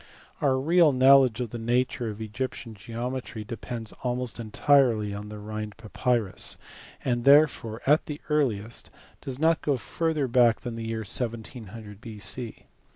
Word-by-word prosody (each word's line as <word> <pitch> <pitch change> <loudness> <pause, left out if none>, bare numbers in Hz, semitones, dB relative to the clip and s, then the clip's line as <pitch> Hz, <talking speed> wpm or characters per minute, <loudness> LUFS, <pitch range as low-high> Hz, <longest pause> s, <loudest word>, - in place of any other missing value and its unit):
Our 135 -2 +3
real 165 +2 +5
knowledge 130 -2 +6
of 120 -3 -4
the 120 - -5
nature 120 0 0
of 105 0 -7
Egyptian 115 +1 -5
geometry 120 +1 -5
depends 115 0 -6
almost 125 -2 -2
entirely 115 -2 +3
on 105 +1 -6
the 105 - -7
Rhirid 105 0 -6
papyrus, 115 -2 -2 0.5
and 120 -2 0
therefore 140 -6 +4
at 150 +3 +3
the 150 -1 -5
earliest 120 -8 -1 0.3
does 130 -2 -4
not 160 +2 +3
go 145 -3 +1
further 155 +1 -1
back 120 -2 +4
than 120 -3 -5
the 115 -1 -5
year 115 0 -2
1700 110 -2 -5
B.C. 110 +2 -6
120 Hz, 145 wpm, -27 LUFS, 110-130 Hz, 0.5 s, knowledge